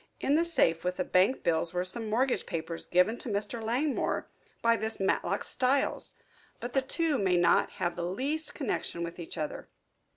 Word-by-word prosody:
In 275 - +1
the 320 +3 +4
safe 210 - +2
with 180 0 -1
the 185 - +1
bankbills 180 -4 +2
were 180 +1 0
some 220 +4 -1
mortgage 250 +4 +1
papers 165 -1 -4
given 180 +7 +3
to - - -3
Mr. 210 +3 -2
Langmore 260 +6 0 0.4
by 230 0 +5
this 220 0 0
Matlock 195 0 0
Styles. 265 +2 +1 0.5
But 240 +1 -6
the 270 - +3
two 305 +2 0
may 185 -3 +2
not 175 -1 +3
have 175 -2 -2
the 175 - -3
least 285 - -2
connection 210 - -2
with 170 +1 -6
each 170 0 -7
other." 155 -2 -4
210 Hz, 175 wpm, -30 LUFS, 175-260 Hz, 0.5 s, by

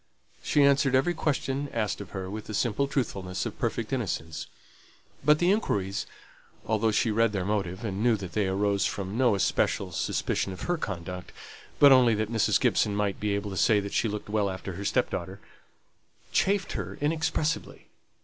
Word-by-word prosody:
She 145 - +3
answered 140 -1 +4
every 135 +7 +3
question 140 -3 -1
asked 110 -3 -2
of 100 - -9
her 95 -2 -5
with 105 +3 -6
the 110 - -4
simple 120 +5 +1
truthfulness 95 -9 -2
of - - -6
perfect - - -2
innocence; 80 0 -3 0.8
but 150 +2 +5
the 175 +3 +3
inquiries 100 - -1 0.6
(although 110 0 +1
she 110 +1 +2
read 115 0 +2
their 95 -3 -1
motive, 100 0 -2
and 100 -1 -3
knew 120 -1 +4
that 95 -3 -7
they 105 -3 0
arose 100 +1 +1
from 100 0 -4
no 120 -3 +3
especial 95 - 0
suspicion 95 - -1
of 95 - -10
her 175 - 0
conduct, 90 - -5 0.5
but 140 -1 +8
only 125 -4 +6
that 110 +1 -2
Mrs. 115 -2 +2
Gibson 105 -1 +2
might 100 -2 -1
be 105 -1 0
able 100 0 -3
to 95 - -5
say 105 +5 +4
that 100 0 -5
she - - +2
looked 105 0 -5
well 105 -1 0
after 95 0 -6
her 100 +3 -6
stepdaughter) - - -1 0.9
chafed 195 0 +1
her 95 -1 -5
inexpressibly. 155 +1 -1
105 Hz, 180 wpm, -27 LUFS, 100-130 Hz, 0.9 s, but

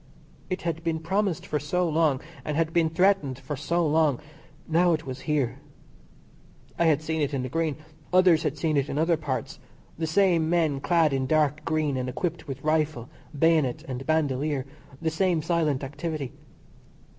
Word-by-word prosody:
It 185 - -3
had 165 -1 -2
been 165 -1 0
promised 190 +2 -1
for 150 - -1
so 175 +5 0
long, 155 -4 +2 0.2
and 150 -1 -2
had 165 0 0
been 165 -2 +3
threatened 165 -6 +2
for 140 +2 -5
so 170 +5 0
long. 150 -4 +2 0.5
Now 170 +2 +3
it 160 0 -2
was 130 -1 -6
here. 135 -4 0 1.2
I 170 - +4
had 155 -1 +3
seen 160 0 -1
it 145 -1 0
in 130 - -1
the 130 - -4
Green, 160 0 -1 0.4
others 180 -3 +5
had 150 -1 -2
seen 155 -1 0
it 140 +1 0
in 140 - -3
other 165 +2 +3
parts 150 -4 -4 0.4
the 160 - -1
same 170 -2 +3
men 160 -5 +2
clad 165 -1 +2
in 130 -1 0
dark 155 0 +2
green 155 -4 0
and 130 0 -2
equipped 170 +5 -3
with 135 -1 -6
rifle, 155 -5 0 0.3
bayonet, 155 -5 +2
and 130 -1 -4
bandolier, 145 -3 0 0.3
the 160 -1 -1
same 170 -1 +1
silent 160 -5 0
activity. 145 -1 -4
155 Hz, 175 wpm, -26 LUFS, 140-165 Hz, 1.2 s, others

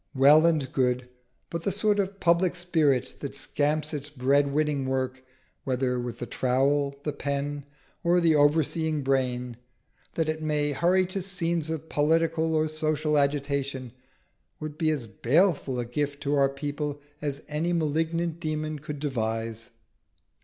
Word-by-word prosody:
Well 145 +5 +7
and 150 -6 +1
good. 125 -1 0 0.4
But 170 - -3
the 195 - 0
sort 210 +1 +2
of 195 0 -2
public 175 +1 +3
spirit 155 -8 +1
that 140 -1 -6
scamps 150 +2 -1
its 145 0 -4
bread 140 +1 +2
winning 145 -2 0
work, 130 0 -2 0.4
whether 125 -1 0
with 120 -1 -4
the 120 - -4
trowel, 140 +3 +1
the 150 - -2
pen, 140 0 -3 0.4
or 175 +1 +4
the 165 -2 +4
overseeing 155 +1 +2
brain, 125 -3 0 0.6
that 160 -1 0
it 155 0 -2
may 150 -1 0
hurry 180 +6 +3
to 190 +2 -4
scenes 170 -4 -2
of 160 0 -4
political 160 +1 +1
or 155 0 +2
social 155 -1 0
agitation, 140 -3 0 0.7
would 155 -1 -6
be 160 0 +1
as 145 -6 -1
baleful 140 - +1
a 120 - -2
gift 145 +4 -3
to 145 - 0
our 140 -1 +4
people 145 +1 -4 0.2
as 145 -1 -3
any 155 +3 -1
malignant 165 +1 0
demon 155 -2 -3
could 150 -1 -6
devise. 115 -4 -3
150 Hz, 150 wpm, -27 LUFS, 135-160 Hz, 0.7 s, Well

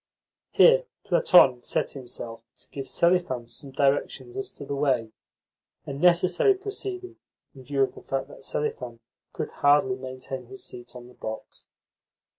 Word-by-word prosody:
Here - - +6 0.2
Platon 130 -9 +5
set - - -1
himself 120 -3 -8 0.2
to - - -11
give 135 -1 -6
Selifan 170 -9 +1
some 135 +4 -8
directions 140 - 0
as 400 -1 -4
to 140 - -9
the 140 - -4
way, 130 -6 +1 0.7
a - - -5
necessary 180 - +4
proceeding 385 -1 -6 0.4
in 135 - -13
view 135 +1 +1
of 135 - -1
the - - -12
fact 135 0 -3
that - - -13
Selifan 125 -5 -3 0.3
could - - -4
hardly 150 +7 +3
maintain 130 0 -7
his 395 -1 -6
seat 120 - -8
on 120 -1 -10
the 125 - -16
box. 110 -2 -8
140 Hz, 150 wpm, -26 LUFS, 130-180 Hz, 0.7 s, Here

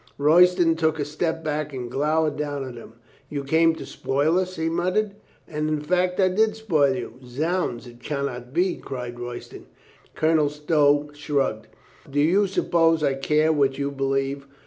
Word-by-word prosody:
Royston 170 +3 +5
took 160 -1 +1
a 145 - 0
step 160 +2 -2
back 150 -1 -2
and 125 -2 -5
glowered 150 +2 +1
down 145 -2 -3
at 125 - -8
him. 115 -1 -12 0.4
"You 145 -1 -4
came 160 +3 +3
to - - -8
spoil 150 +6 0
us?" 185 0 -3
he 160 0 -2
muttered. 185 +5 0 0.3
"And 150 0 -2
in 155 -1 0
fact 180 +4 0
I 190 - +5
did 215 +4 +2
spoil 155 -12 +2
you." 125 -1 -7
"Zounds, 145 +1 -2
it 120 0 -14
can 140 0 -2
not 125 -2 -6
be!" 180 +5 +1
cried 125 -2 -7
Royston. 120 0 -8 0.5
Colonel 155 -2 +2
Stow 150 -1 +2
shrugged. 140 -7 -1 0.4
"Do 145 +1 -1
you 185 +7 +3
suppose 165 -4 +2
I 140 - +2
care 150 +3 +2
what 140 -3 +1
you 140 0 -2
believe?" 135 0 -2
150 Hz, 170 wpm, -24 LUFS, 135-165 Hz, 0.5 s, Royston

